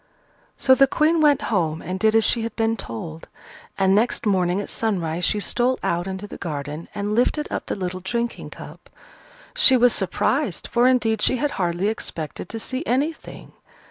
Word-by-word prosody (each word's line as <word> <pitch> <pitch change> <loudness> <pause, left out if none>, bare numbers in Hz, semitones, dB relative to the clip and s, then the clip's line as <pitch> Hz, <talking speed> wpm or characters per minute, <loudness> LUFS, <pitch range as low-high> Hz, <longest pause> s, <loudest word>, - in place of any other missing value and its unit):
So 260 - +5
the 275 +1 +5
Queen 315 +4 +2
went 295 -2 +4
home 160 -5 0
and 185 +3 -4
did 220 +1 +3
as 225 - +5
she 235 - +3
had 230 -1 -4
been 225 0 +1
told: 160 - -7 0.5
and 190 -1 +3
next 225 +3 +1
morning 185 -2 +1
at 205 - -4
sunrise 180 -6 -2
she 210 - +1
stole 245 +5 +1
out 175 +2 -1
into 190 +1 -5
the - - -10
garden 150 -1 -5
and 205 +1 -2
lifted 250 +6 +1
up - - -4
the - - -2
little 185 -1 -4
drinking 235 +5 -3
cup. - - -12 0.7
She 280 - +6
was 245 0 +4
surprised, - - 0
for 240 +1 +4
indeed 225 -4 +2
she 255 - +2
had 290 +2 -1
hardly 175 +1 -1
expected 165 -7 -4
to 225 - -5
see 260 +5 -3
anything. 290 +6 -3
215 Hz, 180 wpm, -22 LUFS, 180-245 Hz, 0.7 s, She